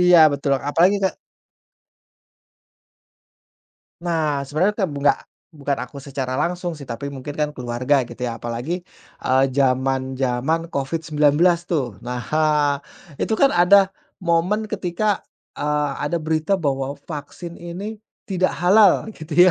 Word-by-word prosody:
Iya, 180 -1 +7
betul, 140 0 -1 0.2
apalagi 180 +7 +4
ka 190 - +2 2.9
Nah, 160 -4 0
sebenarnya 180 +9 +1
kebu 145 -3 -7
nggak - - +4 0.3
bukan 145 -2 -2
aku 140 - -14
secara 135 -2 -4
langsung, 175 +1 -1
sih, 145 -4 -10
tapi 140 +4 -5
mungkin 140 +2 -7
kan 150 -1 0
keluarga 125 +2 0
gitu, 125 - -6
ya, 115 -1 -4
apalagi, 120 +10 -3 0.4
eee, 130 +1 +3
jaman-jaman 130 +2 +1
COVID-19, 150 0 +1 0.3
tuh. 130 - -2
Nah, 125 +1 -4
hah, 150 +3 +2 0.5
itu 220 - 0
kan 275 - +4
ada 190 +2 +5 0.2
momen 180 +5 +1
ketika, 210 -1 -1 0.3
eee, 150 0 0 0.2
ada 170 - 0
berita 160 +3 0
bahwa 140 -4 -2
vaksin 150 +3 -8
ini 195 +6 -6 0.2
tidak 185 -2 0
halal, 195 +2 +5
gitu, 160 +1 +3
150 Hz, 125 wpm, -22 LUFS, 135-175 Hz, 2.9 s, Iya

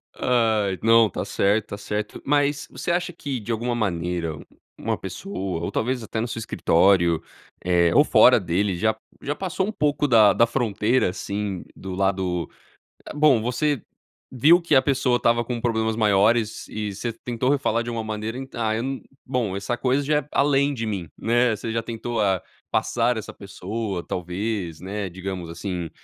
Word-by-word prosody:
Ai. 110 -6 +1
Não, 115 -1 +5
tá - - -4
certo, 105 +2 +1
tá 100 - -5
certo. 105 +1 -4
Mas, 145 0 +1
você - - -3
acha 175 0 -1
que 140 -5 -4
de 110 +2 -5
alguma 120 +2 -1
maneira, 85 -6 -2
u - - -12 0.4
uma - - -1
pessoa 95 -3 -5
ou 85 - -3
talvez 125 +2 -1
até 110 0 -3
no 115 - -2
seu 115 - -5
escritório, 85 -5 +3 0.4
eh, 85 -2 +3
ou - - +7
fora - - +6
dele, 90 +2 0
já 110 +4 +1 0.3
já 145 +1 -2
passou 190 0 -2
um 215 - -3
pouco 150 -5 +1
da 110 -5 +6
da 115 - +3
fronteira 115 -2 +1
assim 100 0 -4
do 95 0 -7
lado, 95 -2 -1 0.6
hã - - -8
bom, 145 -6 +5
você 130 +3 0 0.5
viu 155 +8 +5
que 165 -3 +2
a 130 - +7
pessoa 130 -2 +2
estava 120 0 +2
com 120 0 -4
problemas 110 -2 0
maiores 110 +1 +2
e 105 -2 -4
você 115 +4 -3
tentou 120 +2 -3
re 145 - +4
falar 115 -4 0
de 120 - -5
uma 115 -1 -3
maneira, 110 +2 -4
"Ent 135 0 -8
ah, 110 -2 0
eu 115 - -2
num 135 0 -3 0.2
bom, 125 -7 -1
essa 100 +5 -2
coisa 130 +3 +1
já 150 +2 +2
é 145 - -9
além 140 0 +3
de 115 -4 -3
mim", 95 -6 -4
né. 120 0 +2
Você 110 +2 -5
já 115 - 0
tentou 115 0 -3
a 95 -2 +2 0.3
passar 120 0 +1
essa 110 - -6
pessoa, 100 -1 -5
talvez, 90 -1 -3
né, 100 +1 -4
digamos, 90 -1 -6
assim. 85 0 -4
110 Hz, 185 wpm, -24 LUFS, 95-125 Hz, 0.6 s, ou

